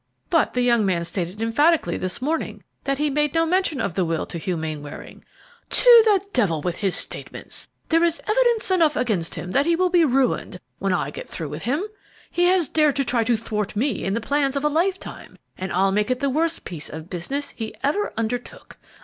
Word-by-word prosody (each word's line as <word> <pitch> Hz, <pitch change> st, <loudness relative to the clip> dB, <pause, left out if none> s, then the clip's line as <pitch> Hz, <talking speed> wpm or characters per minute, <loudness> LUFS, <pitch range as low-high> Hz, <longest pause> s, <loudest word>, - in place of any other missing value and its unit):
"But 330 Hz, -6 st, +2 dB
the 250 Hz, -, +2 dB
young 235 Hz, -2 st, +3 dB
man 175 Hz, -4 st, 0 dB
stated 185 Hz, +4 st, -3 dB
emphatically 290 Hz, -, +2 dB
this 185 Hz, +6 st, -3 dB
morning 320 Hz, +4 st, -2 dB, 0.2 s
that 275 Hz, 0 st, 0 dB
he 295 Hz, 0 st, 0 dB
made 295 Hz, +1 st, 0 dB
no 330 Hz, 0 st, +3 dB
mention 355 Hz, -4 st, +1 dB
of 195 Hz, -, -1 dB
the 185 Hz, -, +1 dB
will 165 Hz, -2 st, -1 dB
to 170 Hz, -, -6 dB
Hugh 175 Hz, +2 st, -2 dB
Mainwaring." 155 Hz, -2 st, -7 dB, 0.5 s
"To 480 Hz, -2 st, +7 dB
the 415 Hz, -3 st, +5 dB
devil 190 Hz, -, +2 dB
with 175 Hz, +3 st, -3 dB
his 195 Hz, -3 st, 0 dB
statements! -, -, -5 dB, 0.2 s
There 330 Hz, +1 st, +4 dB
is 340 Hz, -1 st, +2 dB
evidence 465 Hz, -2 st, +2 dB
enough 330 Hz, -5 st, +3 dB
against 200 Hz, -9 st, -1 dB
him 180 Hz, -, -5 dB
that 280 Hz, -, +2 dB
he 340 Hz, -, +4 dB
will 365 Hz, +1 st, +1 dB
be 350 Hz, -2 st, +5 dB
ruined 260 Hz, -, +1 dB, 0.2 s
when 195 Hz, 0 st, 0 dB
I 160 Hz, -6 st, 0 dB
get -, -, -8 dB
through 160 Hz, -3 st, -4 dB
with 150 Hz, +6 st, -6 dB
him. 285 Hz, +9 st, 0 dB, 0.5 s
He 350 Hz, -, +2 dB
has 360 Hz, -3 st, +3 dB
dared 305 Hz, -3 st, +2 dB
to 275 Hz, -1 st, 0 dB
try 235 Hz, -2 st, +1 dB
to 235 Hz, 0 st, +2 dB
thwart 210 Hz, -2 st, -3 dB
me 245 Hz, +1 st, 0 dB
in 195 Hz, +2 st, -1 dB
the 230 Hz, -, -1 dB
plans 280 Hz, +3 st, 0 dB
of 280 Hz, +1 st, -1 dB
a -, -, +4 dB
lifetime, 360 Hz, +5 st, -2 dB, 0.2 s
and 190 Hz, +1 st, -5 dB
I'll 195 Hz, +2 st, +2 dB
make 210 Hz, +3 st, +1 dB
it 255 Hz, 0 st, 0 dB
the 280 Hz, 0 st, 0 dB
worst 325 Hz, +4 st, 0 dB
piece 160 Hz, -4 st, -6 dB
of 160 Hz, +1 st, -8 dB
business 275 Hz, +12 st, -3 dB
he 225 Hz, -2 st, -6 dB
ever 350 Hz, +10 st, 0 dB
undertook. 235 Hz, +2 st, -4 dB
250 Hz, 215 wpm, -23 LUFS, -, 0.5 s, To